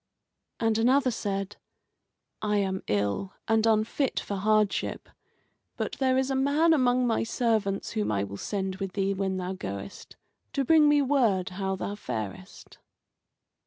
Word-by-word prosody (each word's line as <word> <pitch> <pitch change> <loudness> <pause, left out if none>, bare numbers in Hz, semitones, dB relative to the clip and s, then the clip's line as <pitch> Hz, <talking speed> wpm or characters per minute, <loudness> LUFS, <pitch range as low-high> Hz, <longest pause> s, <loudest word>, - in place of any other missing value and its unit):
And 225 -1 +1
another 255 +3 +3
said: 200 -2 -3 0.8
"I 210 -1 +1
am 190 -1 -1
ill 105 - -1
and 225 0 +3
unfit 225 +5 +1
for 200 - -4
hardship, 210 +1 +1 0.7
but - - -2
there 260 -1 +2
is 265 +1 +1
a - - 0
man 290 +5 +3
among 250 -3 +3
my 230 -2 +1
servants 220 -4 0
whom 105 0 -1
I 100 -2 0
will 100 0 -6
send 190 - -3
with 195 -2 -4
thee 195 -1 0
when 190 -1 -2
thou 185 0 -3
goest, 100 - -7 0.4
to 275 -1 0
bring 310 +1 +6
me 295 -1 +4
word 235 -10 +2
how 190 +1 -2
thou 195 +2 -4
farest." 110 - -7
205 Hz, 150 wpm, -27 LUFS, 190-250 Hz, 0.8 s, bring